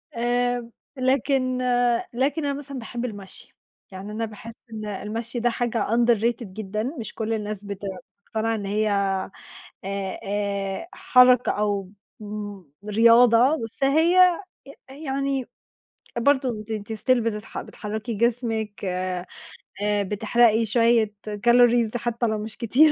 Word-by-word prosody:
آآ، 245 0 0 0.3
لكن 260 0 +1 0.6
لكن 280 +5 0
أنا 280 - 0
مثلًا 275 -1 -6
باحب 240 +1 -5
المشي، 205 -5 -10 0.4
يعني 190 +2 -8
أنا 225 +2 -2
باحس 220 +1 -10 0.2
إن 215 -1 -5
المشي 225 +4 -4
ده 240 - +2
حاجة 235 -2 -1
underrated 235 +1 +2
جدًا، 215 +1 -4
مش 255 -2 -5
كلّ 225 0 -2
الناس 210 -2 -4
بتقتنع 200 +3 -4
إن 205 -2 -4
هي 210 +2 0
آآ، 195 -1 0 0.9
آآ 200 - -2
حركة 250 -9 +5
أو 205 -2 -1 0.3
مم 205 -2 -7 0.2
رياضة، 230 +5 +5
بس 225 +4 -5
هي 340 +6 +5 0.5
يعني 275 -2 -2 0.7
برضه 255 -4 +1
ت - - -3
ت 215 0 -4
still 240 +4 +2
بتتح 220 -2 -4
بتحرّكي 220 +2 -5
جسمِك 225 -2 -1
آآ، 185 -1 -2 0.6
بتحرقي 210 +3 +2
شوية 230 -1 +3 0.3
calories 240 -1 +5
حتى 235 +1 -1
لو 220 -1 0
مش 215 +1 -7
كتير 275 +7 +5
225 Hz, 120 wpm, -24 LUFS, 210-245 Hz, 0.9 s, حركة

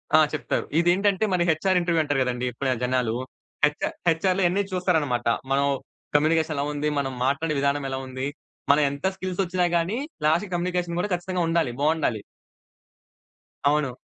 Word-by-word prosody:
ఆ! - - +8
చెప్తారు. 150 - -1
ఇదేంటంటే 190 +4 +3
మన 180 - +2
హెచ్‌ఆర్ 185 +4 +1
ఇంటర్వ్యూ 170 -2 +1
అంటారు 145 -2 0
గదండీ 125 0 -2
ఇప్పుడా 130 +2 -1
జనాలు. 125 -2 +1 0.5
హెచ్‌ఆర్ 150 0 -2
హెచ్‌ఆర్‌లో 185 +4 +1
ఇయన్ని 185 +4 +2
చూస్తారనమాట. 160 -10 0 0.3
మనం 140 +1 +3 0.5
కమ్యూనికేషన్ 155 +1 +3
ఎలా 140 - 0
ఉంది? 150 +1 -1
మనం 135 -2 -2
మాట్లాడే 150 +3 0
విధానం 140 +1 +1
ఎలా 135 - -3
ఉంది? 130 +1 -4 0.4
మనం 145 +1 +4
ఎంత 140 +3 -6
స్కిల్స్ 185 0 -3
ఒచ్చినా 180 0 0
గాని, 175 +7 -1 0.3
లాస్ట్‌కి 170 +5 +2
కమ్యూనికేషన్ 175 -1 -1
గూడా 200 +2 -2
ఖచ్చితంగా 180 +1 -3
ఉండాలి. 165 -6 +1
బావుండాలి. 150 -8 +1 1.4
అవును. 140 -3 +1
155 Hz, 150 wpm, -25 LUFS, 140-180 Hz, 1.4 s, ఆ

